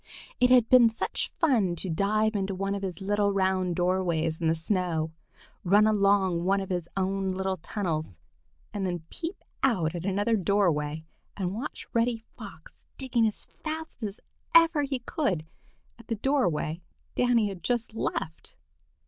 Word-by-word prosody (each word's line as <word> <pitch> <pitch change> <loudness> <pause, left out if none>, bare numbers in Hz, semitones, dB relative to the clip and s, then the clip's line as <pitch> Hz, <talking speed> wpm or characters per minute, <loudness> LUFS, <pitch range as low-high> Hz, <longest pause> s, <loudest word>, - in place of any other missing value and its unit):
It 250 -1 +5
had 250 -3 +6
been 245 -2 +7
such 225 - -3
fun 230 - +3
to 175 - -3
dive 210 +5 +1
into 195 -1 -1
one 195 +1 -1
of 200 - -3
his 190 0 -5
little 205 +1 +1
round 190 -2 +1
doorways 175 -3 0
in 165 - +1
the 160 - +3
snow, 165 -2 -1 0.5
run 205 +4 +5
along 200 -4 +3
one 195 +2 +2
of 195 -1 -5
his 175 -2 -2
own 195 0 0
little 190 0 -2
tunnels, 160 - -3 0.6
and 205 -2 -3
then 175 -3 -2
peep 340 +3 -6 0.2
out 180 -12 +2
at 175 -1 -5
another 205 +4 +1
doorway 165 -6 +1 0.3
and 185 -2 -2
watch 235 +7 -5
Reddy 235 0 +2 0.2
Fox - - -12
digging 240 -4 +1
as 215 - -5 0.2
fast 315 -3 -5
as 210 -1 -4 0.4
ever 330 -2 +6
he 275 -2 -1
could 240 - -1 0.6
at 235 - -15
the 230 - -1
doorway 180 - 0 0.3
Danny 240 -4 +2
had 190 -3 -8
just 240 -3 -1
left. 160 -7 -4
195 Hz, 155 wpm, -28 LUFS, 175-225 Hz, 0.6 s, been